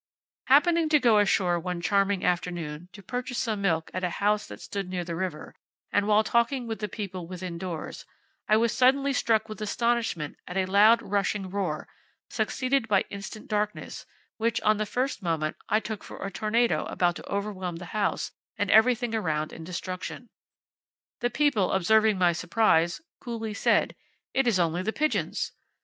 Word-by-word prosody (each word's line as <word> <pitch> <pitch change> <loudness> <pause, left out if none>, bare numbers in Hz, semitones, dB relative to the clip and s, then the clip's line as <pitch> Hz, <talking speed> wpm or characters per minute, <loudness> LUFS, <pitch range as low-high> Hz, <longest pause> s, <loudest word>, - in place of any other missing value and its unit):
"Happening 320 +4 +4
to 300 -1 +5
go 235 -5 +5
ashore 185 -3 +2
one 180 0 -3
charming 195 +1 +1
afternoon, 175 -2 -2
to 200 - -13
purchase 250 +4 -4
some 220 -5 -1
milk 165 -4 0
at 185 - -3
a 180 - +1
house 210 +4 0
that - - -9
stood 195 -2 -5
near 180 -1 -2
the 170 -1 -5
river, 165 -3 -4 0.4
and 205 0 +2
while 215 0 +4
talking 235 +3 +1
with 225 -1 -4
the 210 - -2
people 185 -4 -6
within 180 -1 -6
doors, 170 -2 -5 0.5
I 215 - +6
was 230 0 +2
suddenly 275 +2 +3
struck 220 -3 +2
with 215 0 -8
astonishment 225 - -1
at 180 - -5
a 190 - +2
loud 210 +5 +5
rushing 200 -1 -1
roar, 185 -6 -2 0.4
succeeded 265 -2 0
by 200 -3 +3
instant 200 +2 -8
darkness, 210 0 -3 0.3
which, 230 0 0
on 215 0 +3
the 215 0 -2
first 255 +3 -2
moment, 160 -4 -1
I 215 - +4
took 220 -2 -6
for - - -8
a 195 - -4
tornado 225 +4 +1
about 175 -1 +1
to - - -11
overwhelm 200 -3 -3
the 175 +2 -8
house 210 -2 -1 0.3
and 205 -1 0
every 230 +3 +6
thing 240 -1 -4
around 155 -8 -1
in 165 - -8
destruction. 185 +6 -6 0.9
The 245 - 0
people 255 -10 +2
observing 215 +3 +4
my 180 -2 +4
surprise, 175 -1 +2 0.2
coolly 225 -3 -5
said, - - +2 0.4
'It 270 -1 +2
is 225 -5 +3
only 170 +1 +1
the 220 +4 -2
pigeons!' 305 +1 -1
205 Hz, 175 wpm, -27 LUFS, 180-230 Hz, 0.9 s, I